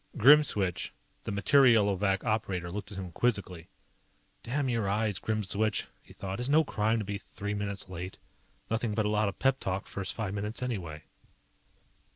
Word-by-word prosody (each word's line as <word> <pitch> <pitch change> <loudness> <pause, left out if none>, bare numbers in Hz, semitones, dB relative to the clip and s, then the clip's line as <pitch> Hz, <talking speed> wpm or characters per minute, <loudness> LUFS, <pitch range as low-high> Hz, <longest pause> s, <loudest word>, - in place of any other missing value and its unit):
Grimswitch, 110 - +5 0.3
the - - -5
Materielovac 100 -3 +4
operator 100 -6 -1
looked 105 +3 -6
at 100 - -7
him 95 -2 -5
quizzically. 95 -5 -1 0.7
Damn 135 +3 -1
your 115 -5 0
eyes, 105 -1 0
Grimswitch, 110 0 0 0.2
he - - -19
thought. 95 +1 -5
_It's 125 +2 -1
no 155 +2 +5
crime 110 -4 0
to 110 - -2
be 100 0 -3
three 105 +1 -5
minutes 100 -1 -3
late. 90 +1 -7 0.5
Nothing 115 -1 0
but 110 -1 +1
a - - +1
lot 105 -1 +2
of 100 - -8
pep 135 0 +2
talk 95 +1 -2
first 100 -2 -4
five 105 -4 -3
minutes 105 +4 -3
anyway. 85 -11 -4
105 Hz, 165 wpm, -30 LUFS, 95-115 Hz, 0.7 s, Grimswitch